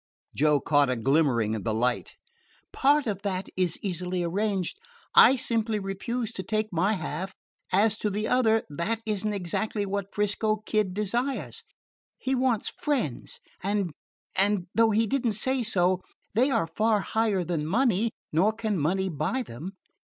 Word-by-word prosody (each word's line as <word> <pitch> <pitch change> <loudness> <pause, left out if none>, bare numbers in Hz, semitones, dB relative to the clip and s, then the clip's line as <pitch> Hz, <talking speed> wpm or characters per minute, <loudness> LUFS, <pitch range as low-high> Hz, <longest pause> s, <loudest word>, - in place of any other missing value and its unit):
Joe 150 0 +3
caught 145 -1 +3
a 125 - +1
glimmering 125 -3 +2
of 105 - -5
the 110 +1 -1
light. 120 +2 -1 0.6
"Part 285 +2 +3
of 200 -4 -2
that 190 -2 -3
is 185 -2 +1
easily 180 -1 -2
arranged. 190 +1 -1 0.3
I 265 - +8
simply 225 -3 0
refuse 210 +4 -3
to 190 - -5
take 215 +2 -2
my 185 +6 +2
half. 185 +1 -4 0.4
As 210 +3 +3
to 210 - 0
the 210 +2 -2
other 225 -3 +3
that 205 +10 -2
is 210 -2 -1
n't 210 - -1
exactly 205 +3 -2
what 200 0 -3
'Frisco 210 +1 0
Kid 210 -4 0
desires. 235 +6 -1 0.5
He 265 - -2
wants 255 -4 +1
friends 255 - -2 0.2
and 200 -1 0 0.4
and 195 -1 +2
though 225 -1 +4
you 220 +2 +3
did 270 +4 -1
n't 215 - +1
say 260 +5 +1
so, 185 -4 +2 0.3
they 245 +6 +3
are 225 -9 +2
far 215 +5 +1
higher 215 -3 0
than 160 -3 -2
money, 230 +2 +2 0.2
nor 185 +8 +3
can 215 -4 -2
money 190 +6 +1
buy 175 - -1
them. 165 - -8
200 Hz, 160 wpm, -27 LUFS, 175-225 Hz, 0.6 s, I